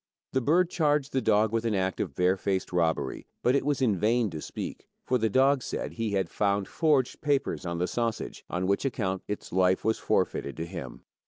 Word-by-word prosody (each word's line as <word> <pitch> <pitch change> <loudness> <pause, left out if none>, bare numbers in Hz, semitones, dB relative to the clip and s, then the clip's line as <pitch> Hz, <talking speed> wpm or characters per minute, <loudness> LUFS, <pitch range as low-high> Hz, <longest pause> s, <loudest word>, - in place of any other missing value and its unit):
The 130 - +2
bird 170 +7 +3
charged 150 -3 +1
the 130 - +2
dog 110 -1 +3
with 115 0 0
an 115 -3 0
act 95 0 -1
of 80 -9 -3
barefaced 95 +1 0
robbery, 85 -2 0 0.2
but 125 - +4
it 140 - +2
was 145 -1 0
in 110 -6 +3
vain 115 0 +2
to 80 - -6
speak, - - -6 0.2
for 125 - +1
the 110 0 +1
dog 135 +4 +4
said - - -4
he 115 -3 -2
had 95 -3 +1
found 100 +1 0
forged 150 -6 +1
letters 140 - 0
on 85 0 -2
the 90 - +1
sausage, 115 +3 -3
on 90 +1 -1
which 100 +1 +1
account 100 -8 -1
its 105 - -5
life 95 +1 +2
was 110 0 +1
forfeited 70 - 0
to 80 - -3
him. 85 -8 -8
105 Hz, 205 wpm, -28 LUFS, 95-130 Hz, 0.2 s, but